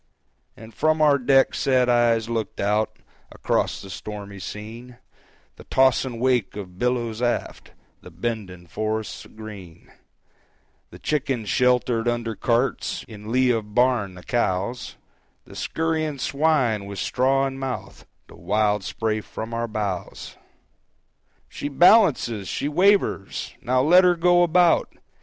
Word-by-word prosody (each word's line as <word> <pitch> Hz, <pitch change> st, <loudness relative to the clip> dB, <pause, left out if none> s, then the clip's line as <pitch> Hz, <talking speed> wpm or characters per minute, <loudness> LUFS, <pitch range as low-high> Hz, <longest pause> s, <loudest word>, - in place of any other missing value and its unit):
And 110 Hz, +1 st, -12 dB
from 155 Hz, +6 st, +1 dB
our 145 Hz, -2 st, +4 dB
deck 135 Hz, +1 st, +3 dB
sad 130 Hz, -2 st, +2 dB
eyes 120 Hz, -2 st, +2 dB
looked 115 Hz, -3 st, -4 dB
out 105 Hz, +2 st, 0 dB, 0.3 s
Across -, -, -1 dB
the 95 Hz, -, -9 dB
stormy 100 Hz, +1 st, -8 dB
scene: 115 Hz, +5 st, -9 dB, 0.6 s
The -, -, -12 dB
tossing 130 Hz, -2 st, +2 dB
wake 125 Hz, -5 st, +1 dB
of 95 Hz, -3 st, -9 dB
billows 120 Hz, -2 st, -1 dB
aft, 120 Hz, -1 st, -3 dB, 0.3 s
The -, -, -12 dB
bending 90 Hz, -1 st, -5 dB
forests 110 Hz, +4 st, -4 dB
green, 100 Hz, -6 st, -12 dB, 1.0 s
The -, -, -12 dB
chickens 130 Hz, -7 st, -2 dB
sheltered 125 Hz, -1 st, +2 dB
under 120 Hz, -1 st, -1 dB
carts 120 Hz, +3 st, -1 dB
In 105 Hz, -1 st, -9 dB
lee 130 Hz, 0 st, +3 dB
of 110 Hz, -3 st, -3 dB
barn 120 Hz, -7 st, +2 dB
the 90 Hz, -, -12 dB
cows, 120 Hz, +2 st, -2 dB, 0.5 s
The -, -, -14 dB
skurrying 160 Hz, -2 st, -2 dB
swine 135 Hz, -7 st, +1 dB
with 100 Hz, -1 st, -7 dB
straw 135 Hz, +6 st, +1 dB
in 135 Hz, 0 st, -5 dB
mouth, 135 Hz, -2 st, -6 dB, 0.2 s
The -, -, -16 dB
wild 105 Hz, -1 st, 0 dB
spray 110 Hz, +2 st, -2 dB
from 110 Hz, +2 st, -7 dB
our 115 Hz, 0 st, -2 dB
bows! 105 Hz, -5 st, -5 dB, 1.1 s
"She 145 Hz, -, -5 dB
balances! 145 Hz, -, +4 dB
She 140 Hz, -, -2 dB
wavers! 180 Hz, -, +1 dB
Now 130 Hz, +1 st, +1 dB
let 180 Hz, +5 st, +6 dB
her 180 Hz, -1 st, +4 dB
go 175 Hz, +1 st, +4 dB
about! 175 Hz, 0 st, +3 dB
120 Hz, 130 wpm, -23 LUFS, 105-135 Hz, 1.1 s, let